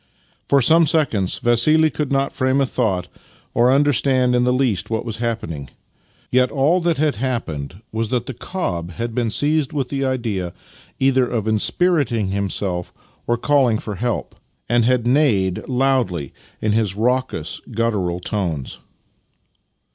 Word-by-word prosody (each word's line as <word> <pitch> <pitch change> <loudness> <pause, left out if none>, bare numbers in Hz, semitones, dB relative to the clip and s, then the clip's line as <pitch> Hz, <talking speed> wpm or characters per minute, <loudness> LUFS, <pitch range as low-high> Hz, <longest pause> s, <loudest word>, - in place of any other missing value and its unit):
For 140 -2 +4
some 165 +5 +5
seconds 125 - +1
Vassili 155 +7 +3
could 145 +1 -3
not 135 0 0
frame 130 +1 +1
a 135 - +3
thought 100 -9 -1 0.5
or 120 +2 +4
understand 135 -2 +2
in 125 0 +2
the 125 - +3
least 125 -7 0
what 110 0 -2
was 115 -2 -5
happening. 110 - -3 0.6
Yet 125 0 +3
all 150 +6 +2
that 170 -1 +1
had 150 -3 +1
happened 100 - -4
was 110 0 -2
that 120 -1 -1
the 130 - -5
cob 90 - -4
had 115 +2 -4
been 120 -1 0
seized 150 +4 +2
with 135 -4 -2
the 135 -1 -2
idea 115 -9 -2 0.5
either 130 -1 +3
of 110 -3 -2
inspiriting 120 - +1
himself 95 -2 -2 0.4
or 120 - +2
of 120 - -11
calling 135 -6 +3
for 105 - -6
help, 120 +4 -3 0.3
and 120 0 +2
had 125 -1 +2
neighed 120 -9 +2
loudly 125 - 0 0.3
in 110 - +2
his 105 -3 0
raucous, 125 -7 -1
guttural 105 -7 -1
tones. 90 - -3
120 Hz, 150 wpm, -20 LUFS, 105-135 Hz, 0.6 s, some